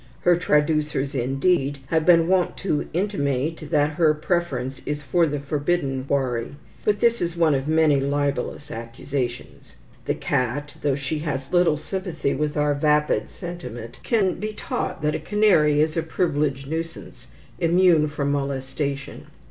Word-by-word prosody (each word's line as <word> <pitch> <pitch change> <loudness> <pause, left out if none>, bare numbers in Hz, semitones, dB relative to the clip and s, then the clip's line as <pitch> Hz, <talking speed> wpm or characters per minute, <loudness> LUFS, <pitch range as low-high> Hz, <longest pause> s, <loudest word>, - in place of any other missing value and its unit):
Her 175 0 +5
traducers, 150 -4 +1
indeed, 135 +3 +1
have 160 0 +1
been 165 -2 +6
wont 185 -1 +1
to 155 -7 -1
intimate 155 -5 -1
that 150 -1 +2
her 155 -3 +4
preference 155 -5 -2
is 150 0 -2
for 165 +5 +2
the 145 -1 -2
forbidden 140 -1 -1
quarry; 130 -2 -1 0.3
but 205 -1 +1
this 235 0 +3
is 170 -1 -2
one 165 -3 +4
of 135 +1 -1
many 155 -2 +4
libellous 145 +1 -2
accusations. 120 - -5 0.3
The - - 0
cat, 140 +4 -1
though 140 -2 +1
she 140 +3 -3
has 140 -1 -4
little 175 -4 +4
sympathy 165 -3 -3
with 150 +2 -2
our 150 0 +2
vapid 150 +1 +1
sentiment, 125 - -8
can 200 -7 +1
be 215 +1 -3
taught 240 - -4
that 150 0 +1
a - - -2
canary 180 -9 +3
is 155 0 +1
a 165 - +1
privileged 150 -5 -1
nuisance, 165 +2 -6 0.3
immune 170 -2 +4
from 145 -1 -2
molestation. 140 0 -3
150 Hz, 150 wpm, -23 LUFS, 140-170 Hz, 0.3 s, been